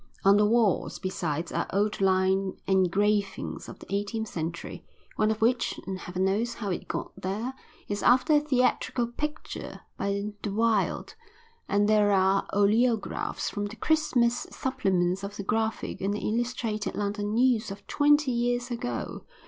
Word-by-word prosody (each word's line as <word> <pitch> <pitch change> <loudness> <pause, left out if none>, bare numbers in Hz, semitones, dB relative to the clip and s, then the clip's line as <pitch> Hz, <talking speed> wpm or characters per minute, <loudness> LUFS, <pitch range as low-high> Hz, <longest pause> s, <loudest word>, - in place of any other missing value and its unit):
On 200 +1 +7
the 210 0 +4
walls, 225 -4 +2
besides, 170 -3 -3
are - - -1
old 205 +1 0
line 190 0 +2
engravings 195 +2 +1
of - - -9
the - - -10
eighteenth 220 +2 -2
century, 170 +1 -5 0.3
one 215 0 +2
of 220 0 -1
which, 245 +2 +1
and 190 -1 -4
heaven 180 +1 -2
knows 220 +5 0
how 205 -4 -3
it 180 - -4
got - - -4
there, 215 +7 -3 0.3
is 205 0 -2
after 260 +6 +4
a 295 - +7
theatrical 255 -3 +1
picture 300 +6 -5 0.2
by 200 +1 -2
De 210 - -3
Wilde; 220 -1 +1 0.6
and 205 +1 +3
there 210 -1 +4
are 195 0 +3
oleographs 220 +3 +1
from 205 0 -2
the 210 - -9
Christmas 250 -5 +1
supplements 190 -7 0
of 200 +1 -5
the 200 - -4
Graphic 220 +2 -1
and 200 +2 0
the - - -3
Illustrated 230 -2 -2
London 205 +1 -2
News 240 -3 +3
of 195 +1 -8
twenty 290 -1 +3
years 245 +1 0
ago. 120 - -4
210 Hz, 155 wpm, -27 LUFS, 195-240 Hz, 0.6 s, On